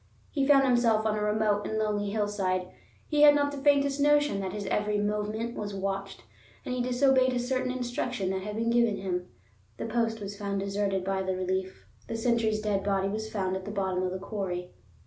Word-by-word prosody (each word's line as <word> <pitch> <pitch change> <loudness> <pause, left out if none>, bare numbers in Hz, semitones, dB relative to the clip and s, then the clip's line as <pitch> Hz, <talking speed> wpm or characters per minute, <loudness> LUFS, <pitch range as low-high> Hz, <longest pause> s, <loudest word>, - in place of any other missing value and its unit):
He 275 -3 0
found 280 -2 +6
himself 240 -4 +3
on 215 -1 +1
a 210 - -2
remote 210 -1 +1
and 220 - -2
lonely 210 -1 0
hillside, 200 -3 -1 0.4
he 295 -1 +1
had 295 -1 +9
not 285 0 +2
the 285 - -6
faintest 280 0 +3
notion 290 -6 +3
that 190 -1 -3
his 205 +1 -5
every 210 +2 0
movement 210 +3 -2
was 205 -1 -4
watched; 195 -6 -4 0.4
and - - -3
he 250 - -1
disobeyed 255 +1 +3
a 245 - 0
certain 255 +1 -1
instruction 245 -5 -2
that 190 0 -2
had 210 +2 -5
been 230 +1 0
given 235 -3 +3
him. 180 -2 -3 0.5
The - - -4
post 225 -1 0
was 205 -1 -6
found 200 -1 -3
deserted 195 -1 -1
by 195 0 -1
the 190 0 -1
relief; 185 0 -3 0.2
the - - -4
sentry's 225 -2 +1
dead 205 -2 0
body 195 -1 +1
was 220 +2 -4
found 190 -3 -1
at 190 - -4
the - - -5
bottom 190 -3 -1
of 185 - 0
the 185 - -3
quarry. 185 -3 -4
210 Hz, 205 wpm, -28 LUFS, 195-240 Hz, 0.5 s, had